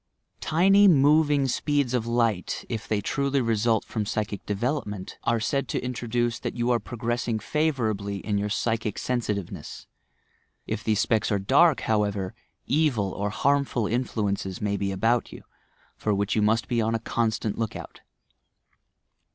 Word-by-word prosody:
Tiny 195 +5 +5
moving 145 -3 +4
speeds 140 0 0
of 120 -2 0
light, 115 -6 0
if 115 -3 -4
they 105 -2 0
truly 140 +6 0
result 115 -2 +1
from 110 - -3
psychic 105 -1 -3
development 105 -2 -3
— - - -42
are 115 0 +2
said 135 +4 -1
to - - -1
indicate 120 -1 -1
that - - -4
you 120 0 0
are 120 - +3
progressing 120 -1 -2
favourably 110 -7 -1
in 100 +1 -2
your 105 +1 -2
psychic 110 0 -1
sensitiveness. 105 -7 -3 0.8
If 105 - -4
these 110 -1 +2
specks 110 0 +1
are 100 - +3
dark, 135 - +4
however, 100 -3 0 0.3
evil 135 -10 +1
or 100 +2 -2
harmful 135 +3 +1
influences 105 -5 -2
may 105 -1 -1
be 100 -1 -1
about 115 +5 +1
you - - -11 0.3
— - - -35
for 105 -2 0
which 100 +1 0
you 110 - +2
must 110 +2 +2
be 120 -2 +1
on 110 +1 0
a - - -1
constant 110 -2 -1
look 110 -1 -2
out. - - -9
115 Hz, 160 wpm, -26 LUFS, 105-125 Hz, 0.8 s, Tiny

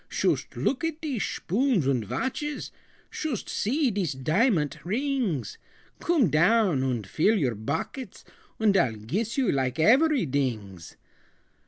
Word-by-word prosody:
"Shoost - - -1
look 280 +4 0
at 325 -1 -2
dese 280 -9 -2
shpoons 220 - 0
und 130 -4 +1
vatches! 295 - -3 0.4
Shoost 285 -9 -3
see 265 +4 0
dese 190 -9 -2
diamant 155 - +1
rings! 225 - -2 0.4
Coom 295 - +2
down 180 - +3
und 125 -5 -1
full 185 - +2
your 135 - +1
bockets, 185 - -5 0.3
Und 215 -3 +3
I'll 125 -11 +2
giss 195 - -3
you 260 -6 +2
like 130 -2 0
averydings. 140 - +1
195 Hz, 125 wpm, -26 LUFS, -, 0.4 s, down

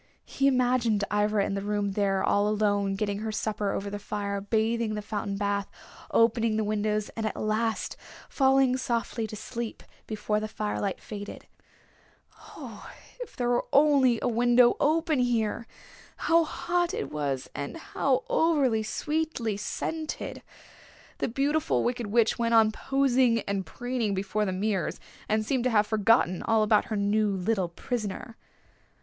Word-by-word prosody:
He 275 - 0
imagined 245 -5 +2
Ivra 210 -1 +2
in - - -2
the 195 - -2
room 205 0 -1
there 195 -1 +1
all 205 0 +2
alone 205 -2 +1
getting 200 0 -2
her 220 0 -3
supper 210 -1 -2
over 200 0 -3
the 205 - -4
fire, 200 -1 -3
bathing 225 +2 0
in 215 - -2
the 210 - -3
fountain 205 -1 -3
bath, 200 0 -1 0.4
opening 230 -1 +3
the 220 - +1
windows, 210 0 -1
and 225 - -5
at 215 - -4
last 220 +1 -1 0.3
falling 265 -1 +3
softly 230 -3 -2
to 215 - -7
sleep 235 +1 -6 0.2
before 210 -1 -1
the 215 - -3
firelight 210 -2 -3
faded. 205 -1 -8 1.1
Oh, - - -9 0.3
if - - -8
there 245 -1 -1
were 245 0 +1
only 275 -4 +5
a - - +2
window 240 +1 +4
open 315 -1 +2
here! 235 -2 0 0.5
How 335 0 +3
hot 350 +3 -1
it 450 - -4
was, 140 -3 -2
and 140 - -5
how 320 -8 0
over 275 -9 +2
sweetly 290 -1 -2
scented! 310 +9 -4 0.8
The - - 0
Beautiful 275 - +1
Wicked 240 -2 -1
Witch 225 +2 +2
went 230 0 +2
on 220 -1 +6
posing 260 -2 +2
and 200 -1 -3
preening 245 -5 -2
before 200 +2 -1
the 190 - -1
mirrors, 195 0 -1 0.3
and 215 0 +1
seemed 255 0 0
to - - +3
have 210 -3 +3
forgotten 215 -3 +2
all 225 -1 +2
about 210 0 +3
her 220 - -3
new 205 +1 +2
little 190 -1 0
prisoner. 215 +3 -5
220 Hz, 155 wpm, -27 LUFS, 205-250 Hz, 1.1 s, on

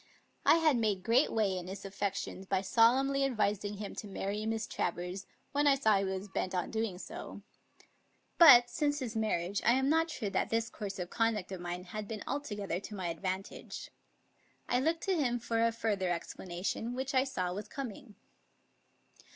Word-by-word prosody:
I - - +8
had 315 -5 +4
made 210 -5 0
great 235 +7 +3
way 210 -4 +1
in 180 -1 -5
his 195 +1 -7
affec 200 0 -2
tions 190 -1 -6
by 190 -1 +1
solemnly 260 +7 +4
advising 210 -5 0
him 205 0 -6
to 210 - -5
marry 205 +2 -3
Miss 225 -1 -1
Travers 180 +1 -3 0.2
when 290 +1 +2
I 280 - +6
saw 220 -7 +3
he 195 - 0
was 190 +1 -3
bent 190 -1 -2
on 180 - -1
doing 220 -4 -2
so; - - -8 1.0
but, 250 -8 +10
since 290 +2 0
his 245 -5 -4
mar 220 -1 +1
riage, 180 +4 -3
I 235 - +5
am 265 +2 +2
not 325 +2 +3
sure 215 -10 -3
fhat - - 0
this 230 0 0
course 200 -2 -5
of 180 -1 -5
conduct 225 -5 0
of 185 -2 -5
mine 175 +1 -4
had 210 +3 -6
been 215 -1 -5
altogether 205 -10 -3
to 210 +2 -8
my 185 -3 -3
advantage. 185 +3 -5 0.8
I 245 - +2
looked 325 +5 0
to 385 - +1
him 250 -7 +1
for 230 -1 0
a 230 - +3
further 210 -5 -1
explanation, 180 +6 -3
which 265 +2 -3
I 260 -1 +4
saw 185 -10 -2
was 205 +2 -5
coming. 230 -4 -7
215 Hz, 190 wpm, -32 LUFS, 190-250 Hz, 1.0 s, but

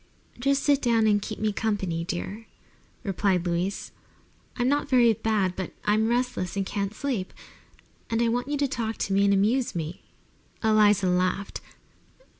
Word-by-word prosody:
"Just 275 +2 +1
sit 285 -1 +3
down 230 -3 +3
and 205 -1 +3
keep 215 - -5
me 215 -1 0
company, 195 -7 -1
dear," 190 +6 -5 0.6
replied 190 -3 0
Louise. 175 +3 -2 0.7
"I'm 245 -1 +1
not 285 +2 +1
very 240 -3 +5
bad, 200 -4 0
but 190 - -5
I'm 215 +1 +3
restless 240 -6 -1
and 195 - 0
can't 200 +1 -3
sleep, 245 -10 -2 0.8
and 225 - 0
I 235 - +3
want 245 +2 -1
you 290 0 -1
to 285 0 +1
talk 230 -5 -3
to 195 - -2
me 200 +1 +4
and 200 - +4
amuse 225 +5 +1
me." 165 +1 -4 0.6
Eliza 210 -3 +4
laughed. 185 +2 0
215 Hz, 160 wpm, -26 LUFS, 190-240 Hz, 0.8 s, very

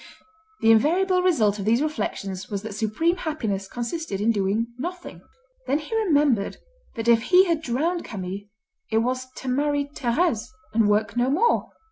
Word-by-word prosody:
The 225 - +5
invariable 360 +11 +3
result 220 - +2
of 195 - -4
these 230 +3 +3
reflections 195 - -3
was 200 -1 -4
that 220 -1 -6
supreme 225 - 0
happiness 220 - -3
consisted 240 - -4
in 220 +3 +3
doing 215 +3 -1
nothing. 355 +5 -6 0.5
Then 285 - +2
he 310 +9 -5
remembered 295 - +2 0.4
that 225 -1 -4
if 230 -1 +5
he 370 +8 +5
had 335 -4 0
drowned 320 +6 -1
Camille, 195 0 -6 0.4
it 220 - +1
was 255 +3 0
to 265 - -9
marry 285 +2 0
Thérèse, 245 -2 0 0.3
and 220 -2 +3
work 210 +2 +1
no 245 +1 +2
more. 370 - +2
245 Hz, 160 wpm, -24 LUFS, 215-320 Hz, 0.5 s, The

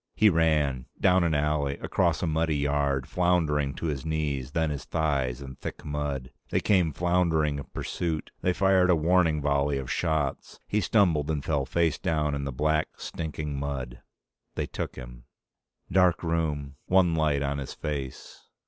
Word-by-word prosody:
He 105 -1 +5
ran. 75 -6 +1
Down 90 -1 +4
an 80 -2 +1
alley, 75 -1 0
across - - 0
a - - +2
muddy 80 -1 +1
yard, 70 -2 0
floundering 80 -6 +1
to - - -5
his 70 -5 -2
knees, 75 -5 -2
then 80 -2 +1
his 70 -2 -4
thighs, 70 -5 -1
in 65 -1 -9
thick - - -7
mud. 75 -3 -3 0.2
They - - +1
came 90 -6 +2
floundering 80 -3 +1
in 70 - -7
pursuit. 80 -4 -3
They 90 - +2
fired 95 -1 +3
a 90 - +6
warning 80 -2 +2
volley 70 0 +1
of 65 -1 -4
shots. 75 -4 -1
He 105 - +1
stumbled 85 -7 +2
and 75 -3 -2
fell 70 -4 0
face 85 -3 +1
down 75 -2 0
in 70 -1 -2
the 70 - -3
black, 75 +4 +1
stinking 75 -3 -4
mud. 65 -3 -4 0.5
They - - -1
took - - -5
him... - - -10 0.7
Dark 90 -2 +3
room. 75 -4 -1
One 90 -2 +4
light, 75 -3 +1
on 70 0 -1
his 70 - -6
face. 70 -4 -6
75 Hz, 165 wpm, -27 LUFS, 70-85 Hz, 0.7 s, a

